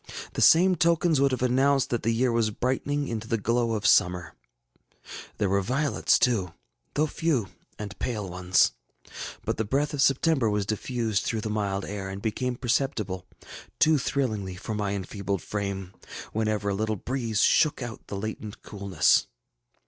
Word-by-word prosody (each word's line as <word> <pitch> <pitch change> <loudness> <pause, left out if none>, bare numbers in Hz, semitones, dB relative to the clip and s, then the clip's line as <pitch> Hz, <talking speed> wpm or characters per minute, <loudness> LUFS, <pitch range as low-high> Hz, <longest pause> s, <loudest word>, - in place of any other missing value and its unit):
The - - -2
same 180 +3 +6
tokens 170 -3 +2
would 140 - +4
have 130 -1 -2
announced 135 +2 +2
that 120 - 0
the 115 - 0
year 120 +2 +2
was 115 -2 +2
brightening 135 +6 -1
into 110 -1 -4
the 115 - 0
glow 115 +2 0
of 105 -2 -3
summer. 90 -4 +3 1.0
There 105 - +1
were 100 +1 +2
violets 130 +4 +2
too, 95 -9 +1 0.4
though 150 - +3
few 150 - -1 0.3
and 105 -1 -7
pale 105 -5 -2
ones. 90 -1 +2 0.7
But - - -1
the 110 - 0
breath 140 +8 0
of 145 - 0
September 135 -3 +3
was 105 -1 0
diffused 110 0 -1
through 110 -1 -1
the 110 - -3
mild 100 -2 -1
air, 100 -1 -5
and 95 0 -5
became 120 +4 -2
perceptible, 115 -7 -1 0.5
too 155 -1 +4
thrillingly 110 -9 -2
for 110 +4 -5
my 100 -1 -1
enfeebled 100 0 -3
frame, 100 -2 -4 0.4
whenever 110 -2 0
a - - 0
little 110 +2 -1
breeze 115 0 -2
shook 150 -4 +3
out 120 -2 -8
the 100 - -5
latent 110 0 -6
coolness. 100 -5 +2
110 Hz, 165 wpm, -27 LUFS, 100-130 Hz, 1.0 s, same